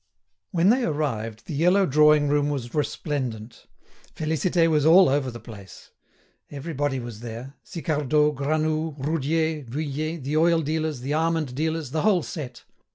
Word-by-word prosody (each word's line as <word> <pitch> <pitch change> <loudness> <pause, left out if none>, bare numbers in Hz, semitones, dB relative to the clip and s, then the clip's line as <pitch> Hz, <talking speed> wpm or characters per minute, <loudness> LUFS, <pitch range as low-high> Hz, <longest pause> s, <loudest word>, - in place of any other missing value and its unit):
When 175 +2 +2
they 250 +3 +3
arrived, 115 - -2
the - - -6
yellow 180 +6 +3
drawing 150 0 +4
room 145 0 +1
was 130 -5 -4
resplendent. 130 -7 -3 0.5
Félicité 165 +2 +1
was 155 -3 +2
all 175 +5 +7
over 135 -1 +1
the 120 -1 -8
place. 105 -5 -13 0.6
Everybody 145 -2 -3
was 120 -3 -8
there; 120 +3 -8
Sicardot, 150 -2 0
Granoux, 155 +2 -1
Roudier, 155 +2 -1
Vuillet, 150 +5 -3
the 145 +3 -1
oil 165 0 +3
dealers, 155 -2 -2
the 135 +3 -3
almond 160 -3 0
dealers, 160 0 -2
the 155 - -1
whole 195 -6 +3
set. 130 -7 -7
150 Hz, 145 wpm, -24 LUFS, 135-160 Hz, 0.6 s, all